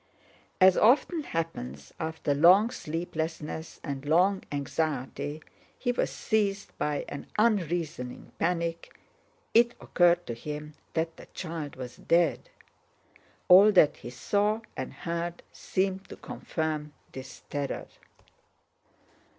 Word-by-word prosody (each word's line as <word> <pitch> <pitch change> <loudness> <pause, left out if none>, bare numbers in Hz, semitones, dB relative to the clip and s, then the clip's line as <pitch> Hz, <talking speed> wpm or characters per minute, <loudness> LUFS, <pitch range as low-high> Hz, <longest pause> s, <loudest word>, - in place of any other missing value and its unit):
As 185 -1 +7
often 290 +8 +4
happens 75 - -5
after 160 -2 -1
long 185 +10 +6
sleeplessness 160 -2 -4
and 140 -1 -4
long 180 +6 +3
anxiety, 145 +1 -2 0.3
he 245 - 0
was 245 - 0
seized 205 -3 -1
by 150 -1 -1
an 145 - -7
unreasoning 170 - 0
panic—it 170 +7 -1
occurred 175 0 +3
to 120 - -4
him 150 +5 -6 0.2
that 165 0 -1
the - - -12
child 160 -4 -5
was 125 -1 -8
dead. 170 - +2 1.0
All 195 +3 +9
that 155 -6 +5
he - - -8
saw 205 - 0
and 130 - -4
heard 170 +4 -4
seemed 190 0 -2
to - - -8
confirm 155 -2 -4 0.2
this 130 0 -10
terror. 145 -1 -3
165 Hz, 110 wpm, -28 LUFS, 150-190 Hz, 1.0 s, All